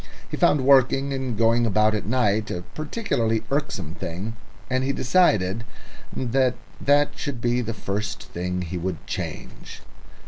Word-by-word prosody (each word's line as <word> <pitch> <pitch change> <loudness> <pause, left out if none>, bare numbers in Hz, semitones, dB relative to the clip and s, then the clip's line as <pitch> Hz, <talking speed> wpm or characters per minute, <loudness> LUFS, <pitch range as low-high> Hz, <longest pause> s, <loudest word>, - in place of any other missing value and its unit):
He - - -1
found 145 - +3
working 135 0 +4
and 130 -4 -3
going 115 +1 +3
about 110 +1 +3
at 105 -2 -2
night 110 -3 +1
a 90 - -4
particularly 120 - -1
irksome 140 - -2
thing, 95 +8 -5 0.3
and 130 0 0
he 135 - +1
decided 115 - +2 0.5
that 130 0 +1 0.3
that 145 +1 +4
should 140 -4 -4
be 120 +1 +1
the 115 -1 -4
first 100 0 -3
thing 90 +1 -3
he 90 +1 -4
would 90 -2 -4
change. - - -6
115 Hz, 145 wpm, -24 LUFS, 100-130 Hz, 0.5 s, working